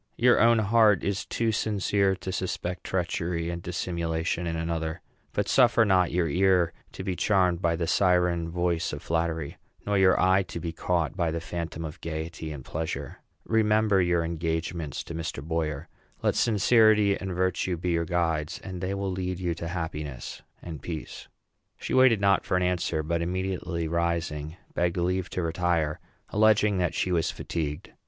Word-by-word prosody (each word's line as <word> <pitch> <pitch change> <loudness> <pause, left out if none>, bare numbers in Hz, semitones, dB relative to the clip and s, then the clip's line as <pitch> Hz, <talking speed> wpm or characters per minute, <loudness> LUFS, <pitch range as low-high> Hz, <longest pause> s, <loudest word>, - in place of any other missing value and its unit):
Your 120 +1 +5
own 115 +1 +6
heart 110 -1 +4
is 100 0 -2
too 115 -1 0
sincere 100 -2 +1
to 95 0 -6
suspect 90 -1 -3
treachery 85 -2 -2
and 85 0 -5
dissimulation 85 -1 -2
in 80 - -2
another; 80 -1 -2 0.3
but - - -1
suffer 120 -3 +5
not 95 -3 +3
your 85 -1 +1
ear 90 +1 +3 0.2
to - - -6
be 95 - -2
charmed 90 -3 +2
by 85 -1 +2
the 85 0 -1
siren 90 -1 +2
voice 85 -1 -1
of 75 - -6
flattery, 80 -2 -2 0.3
nor 100 -1 +1
your 95 -1 +5
eye 95 +1 +4
to 90 -2 -6
be 85 0 -4
caught 85 -1 -1
by 85 -4 0
the 85 +1 -2
phantom 85 -1 -5
of 80 +3 -8
gayety 80 0 -5
and 70 -4 -8
pleasure. 80 +1 -4 0.3
Remember 110 -2 +3
your 85 -1 +2
engagements 80 -2 -3
to - - -8
Mr. 80 -4 -4
Boyer. 80 -2 -2 0.4
Let - - +3
sincerity 110 -2 +4
and 95 -2 -5
virtue 95 0 0
be 90 +2 -2
your 85 0 +1
guides, 80 -3 -1
and 90 -2 -6
they 95 +1 -2
will 100 -1 -2
lead 90 -1 -3
you 90 -2 -1
to 85 0 -6
happiness 80 -5 -5 0.2
and 80 -4 -7
peace." 80 -3 -7 0.5
She - - -5
waited 130 -4 +5
not 100 -1 +3
for 90 - 0
an 90 - +1
answer, 85 -3 0
but, 85 +2 -1
immediately 90 -1 -2
rising, 85 -2 -2 0.2
begged 85 0 0
leave 90 +1 0
to 90 - -3
retire, 85 -2 0 0.3
alleging 105 -2 +3
that 90 - 0
she 90 - 0
was 85 -2 +1
fatigued. 75 0 -4
85 Hz, 170 wpm, -27 LUFS, 80-95 Hz, 0.5 s, own